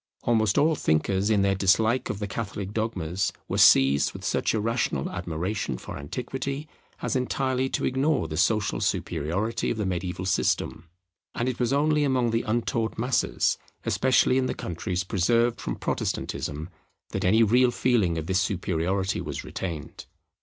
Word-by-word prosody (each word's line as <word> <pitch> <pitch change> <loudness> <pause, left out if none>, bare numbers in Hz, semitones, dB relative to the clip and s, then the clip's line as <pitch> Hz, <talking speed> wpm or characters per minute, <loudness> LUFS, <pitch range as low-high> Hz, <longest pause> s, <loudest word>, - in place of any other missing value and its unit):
Almost 110 -3 +2
all 160 +2 +4
thinkers 95 - +1
in 105 -3 +3
their 100 0 +3
dislike 110 +6 +2
of 105 - -2
the 105 - -3
Catholic 100 -1 -5
dogmas 95 -5 -1 0.2
were - - -1
seized 70 +1 +5
with - - -8
such - - +1
irrational 110 - -1
admiration 90 - -3
for - - -8
Antiquity 135 - -4 0.4
as - - -1
entirely 130 0 0
to - - -1
ignore 135 - +1
the 80 - -5
social 105 +5 +1
superiority 100 +10 -1
of - - -2
the 105 - -1
mediaeval 90 0 -3
system; 85 -4 0 0.5
and 120 - -1
it 130 - -2
was 120 0 +1
only 150 +2 +2
among 130 -4 +1
the 115 +1 +1
untaught 115 0 -1
masses, 120 0 +1 0.3
especially 130 0 +3
in 130 - 0
the - - -2
countries 90 +2 -3
preserved 115 +5 +1
from - - -3
Protestantism, 75 +4 -3 0.4
that - - -3
any 110 +5 +5
real 125 +4 +4
feeling 115 -9 +1
of 80 - -3
this 95 +2 +1
superiority 95 0 -1
was - - -5
retained. 85 -6 -6
105 Hz, 155 wpm, -26 LUFS, 90-120 Hz, 0.5 s, seized